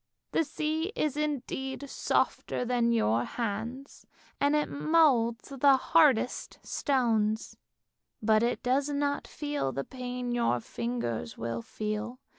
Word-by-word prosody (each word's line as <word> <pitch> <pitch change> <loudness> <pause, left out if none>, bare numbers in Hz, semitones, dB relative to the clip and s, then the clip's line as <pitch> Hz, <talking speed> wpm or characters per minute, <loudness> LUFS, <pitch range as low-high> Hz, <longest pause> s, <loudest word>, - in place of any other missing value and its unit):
The - - +2
sea 315 +4 -2
is 300 -2 0
indeed 280 -2 -3
softer 250 - 0
than 240 -1 +2
your 120 - +2
hands, 235 - -5 0.3
and 285 +1 +3
it 300 - +2
moulds 280 -7 +2
the 275 0 +5
hardest 270 -4 +3
stones, 225 -5 0 0.6
but 215 0 +3
it 240 +2 0
does 270 +3 +1
not 285 0 -1
feel 290 - -2
the 135 +2 -3
pain 250 - -5
your 235 - +1
fingers 120 -7 -4
will 115 0 -3
feel. 215 - -4
250 Hz, 120 wpm, -29 LUFS, 215-285 Hz, 0.6 s, the